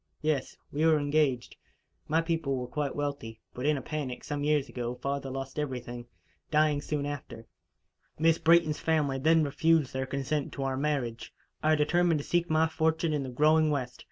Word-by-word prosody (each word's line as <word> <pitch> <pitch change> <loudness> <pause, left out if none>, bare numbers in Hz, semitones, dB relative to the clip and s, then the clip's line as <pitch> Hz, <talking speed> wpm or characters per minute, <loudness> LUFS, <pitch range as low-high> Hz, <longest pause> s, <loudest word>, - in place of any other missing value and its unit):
"Yes. 150 -4 -1
We 150 +2 -1
were 160 -1 +5
engaged. 145 -4 0 0.5
My 160 +2 +2
people 165 -4 -1
were 125 -1 -3
quite 140 +2 -3
wealthy; 140 -6 -4
but, 125 +3 -3
in 150 -1 +3
a 130 - -6
panic, 140 -5 -4
some 145 -1 -3
years 150 -2 +2
ago, 120 0 -4
father 140 +1 -3
lost 135 +1 -5
everything, 125 -4 -5 0.4
dying 150 -1 +2
soon 145 -1 -2
after. 135 -5 -6 0.7
Miss 160 +1 +3
Brayton's 165 -2 +4
family 150 -4 +1
then 160 +3 +4
refused 160 0 +2
their 130 0 -2
consent 140 +2 -2
to 140 - -4
our 135 -1 -1
marriage. 130 -5 -2 0.3
I 155 0 +4
determined 170 +2 +2
to 145 - -4
seek 175 0 0
my 160 +1 +3
fortune 160 0 0
in 150 - 0
the 130 - -5
growing 155 +4 +3
West. 125 -4 -2
145 Hz, 180 wpm, -29 LUFS, 135-155 Hz, 0.7 s, were